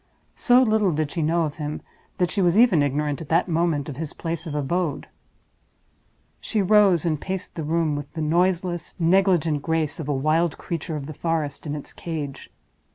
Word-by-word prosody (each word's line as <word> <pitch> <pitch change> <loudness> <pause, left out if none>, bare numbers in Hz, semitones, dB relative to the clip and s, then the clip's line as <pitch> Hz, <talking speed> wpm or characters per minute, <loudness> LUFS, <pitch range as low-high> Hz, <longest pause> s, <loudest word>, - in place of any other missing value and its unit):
So 250 0 +5
little 215 -5 +2
did 155 -1 -1
she 170 - -2
know 165 +2 +2
of 150 -1 -4
him 150 -1 -4 0.4
that 180 -1 +1
she 200 - 0
was 175 +1 +3
even 220 -10 +5
ignorant 145 +1 -1
at 155 - -9
that 165 +3 +2
moment 165 -4 0
of 140 -4 -7
his 155 -1 -5
place 165 0 -4
of 150 - -4
abode. 150 +1 -1 1.3
She 220 - -2
rose 195 -4 +4
and 155 -3 0
paced 190 -1 -4
the 165 - -5
room 160 0 0
with 145 -1 -6
the 165 - -4
noiseless, 175 +1 0
negligent 170 -4 +2
grace 160 -1 -1
of 150 -2 -5
a - - +2
wild 155 +4 +1
creature 165 -1 -4
of 145 -2 -5
the 155 - -7
forest 155 -2 -2
in 145 - -3
its 145 - -7
cage. 150 -5 -6
165 Hz, 190 wpm, -24 LUFS, 150-175 Hz, 1.3 s, So